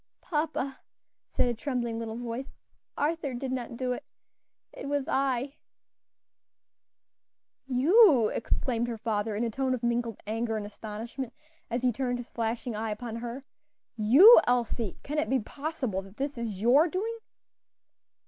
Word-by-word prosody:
"Papa," 300 Hz, -4 st, -2 dB, 0.5 s
said -, -, +1 dB
a 240 Hz, -, +1 dB
trembling 235 Hz, -2 st, -2 dB
little 225 Hz, -1 st, -4 dB
voice, 240 Hz, +2 st, -5 dB, 0.4 s
"Arthur 295 Hz, -3 st, -1 dB
did 255 Hz, +1 st, -4 dB
not 240 Hz, -2 st, -4 dB
do 255 Hz, 0 st, -1 dB
it; -, -, -6 dB, 0.7 s
it 270 Hz, -, -7 dB
was 285 Hz, -1 st, -1 dB
I." 270 Hz, +1 st, 0 dB, 2.1 s
"You," 275 Hz, -, +6 dB
exclaimed 235 Hz, 0 st, -1 dB
her 235 Hz, -1 st, -4 dB
father, 215 Hz, -1 st, -1 dB
in 220 Hz, -, -1 dB
a 230 Hz, -, -1 dB
tone 260 Hz, +2 st, 0 dB
of 245 Hz, -, -8 dB
mingled 235 Hz, -2 st, -1 dB
anger 225 Hz, +1 st, -1 dB
and 210 Hz, -, -4 dB
astonishment, 225 Hz, +4 st, -6 dB, 0.4 s
as 235 Hz, +2 st, -2 dB
he 250 Hz, -, +4 dB
turned 245 Hz, +1 st, -1 dB
his 245 Hz, 0 st, -9 dB
flashing 230 Hz, 0 st, -2 dB
eye 220 Hz, +1 st, -2 dB
upon 225 Hz, +2 st, -4 dB
her, 240 Hz, +3 st, -6 dB, 0.5 s
"you, 275 Hz, -, +9 dB
Elsie! 235 Hz, -4 st, 0 dB
can 300 Hz, +2 st, -2 dB
it -, -, -1 dB
be 265 Hz, 0 st, +3 dB
possible 275 Hz, -5 st, -3 dB
that 195 Hz, +2 st, -15 dB
this 280 Hz, +1 st, -2 dB
is 225 Hz, -5 st, -4 dB
your 275 Hz, +8 st, +6 dB
doing?" 440 Hz, +7 st, -3 dB
245 Hz, 150 wpm, -29 LUFS, 225-275 Hz, 2.1 s, you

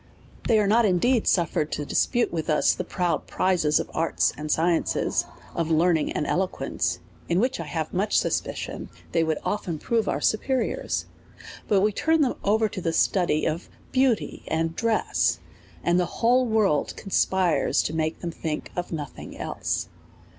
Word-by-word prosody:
They 225 Hz, -, +4 dB
are 210 Hz, -, +3 dB
not 225 Hz, +4 st, +4 dB
indeed 215 Hz, +5 st, +2 dB
suffered 160 Hz, -3 st, +1 dB
to 145 Hz, -, -3 dB
dispute 240 Hz, -, +1 dB
with 160 Hz, -1 st, -3 dB
us 155 Hz, -, +4 dB
the -, -, -4 dB
proud 180 Hz, -1 st, -1 dB
prizes 170 Hz, -5 st, +2 dB
of -, -, -5 dB
arts 165 Hz, +1 st, +1 dB
and 150 Hz, 0 st, -4 dB
sciences, 165 Hz, +1 st, +1 dB, 0.3 s
of 165 Hz, -1 st, -1 dB
learning 165 Hz, 0 st, +2 dB
and 150 Hz, -, -1 dB
elo 190 Hz, +4 st, +1 dB
quence, -, -, -2 dB, 0.3 s
in 170 Hz, +1 st, +2 dB
which 250 Hz, 0 st, 0 dB
I 165 Hz, -, -4 dB
have 155 Hz, 0 st, -4 dB
much 200 Hz, +4 st, +1 dB
suspicion -, -, -2 dB, 0.2 s
they 165 Hz, -, +2 dB
would 160 Hz, -1 st, 0 dB
often 190 Hz, -6 st, -2 dB
prove 225 Hz, +7 st, 0 dB
our -, -, 0 dB
superiors; 265 Hz, -, 0 dB, 0.6 s
but 200 Hz, -2 st, +3 dB
we 210 Hz, +2 st, +3 dB
turn 320 Hz, +8 st, +2 dB
them 265 Hz, -4 st, +2 dB
over 220 Hz, +2 st, +3 dB
to 190 Hz, -, -6 dB
the 165 Hz, -1 st, -1 dB
study 170 Hz, -4 st, +2 dB
of 160 Hz, +2 st, -2 dB, 0.2 s
beauty 260 Hz, -3 st, +1 dB
and 165 Hz, 0 st, -1 dB
dress, 230 Hz, -1 st, +1 dB, 0.5 s
and 175 Hz, +1 st, +3 dB
the 180 Hz, -, +1 dB
whole 250 Hz, +2 st, +3 dB
world 215 Hz, -9 st, +1 dB
conspires 190 Hz, -3 st, +1 dB
to 150 Hz, -, -3 dB
make 160 Hz, 0 st, -2 dB
them 170 Hz, -, -3 dB
think 155 Hz, -2 st, -4 dB
of 175 Hz, 0 st, -4 dB
nothing 150 Hz, -4 st, -6 dB
else. -, -, -3 dB
180 Hz, 170 wpm, -25 LUFS, 160-215 Hz, 0.6 s, They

